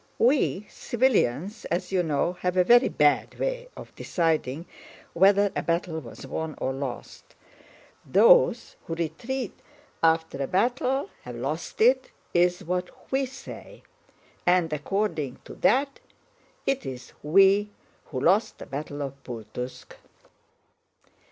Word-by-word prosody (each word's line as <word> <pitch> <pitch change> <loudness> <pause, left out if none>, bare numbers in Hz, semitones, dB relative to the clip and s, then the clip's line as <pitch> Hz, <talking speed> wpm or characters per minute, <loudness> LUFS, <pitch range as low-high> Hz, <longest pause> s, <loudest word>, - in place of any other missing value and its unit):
We 240 -6 +2
civilians, 215 - 0
as 175 +2 -2
you 185 -2 +2
know, 160 +1 0
have 180 0 0
a 180 - +6
very 240 +6 +6
bad 150 0 +2
way - - -2
of - - -10
deciding 160 -3 -1 0.5
whether 200 +3 +4
a - - 0
battle 165 0 -1
was 125 -2 -10
won 155 +3 -4
or 130 - -2
lost. 135 -2 -7 0.7
Those - - +4
who 165 - -3
retreat 205 - -4 0.4
after 160 -3 +2
a 135 - -1
battle 250 +7 0
have 125 -1 -8
lost 145 - -4
it 260 +3 +4 0.2
is 175 0 +2
what 180 +1 -4
we 270 0 +1
say; 270 - -11 0.6
and 175 -3 +3
according 150 -3 -2
to - - -9
that 275 +4 +2 0.7
it 275 0 0
is 125 -2 -8
we 195 +6 +5 0.4
who 130 - -5
lost 200 +6 +3
the - - -9
battle 145 +1 -5
of 140 0 -7
Pultúsk. 120 +1 -7
175 Hz, 125 wpm, -26 LUFS, 150-230 Hz, 0.7 s, a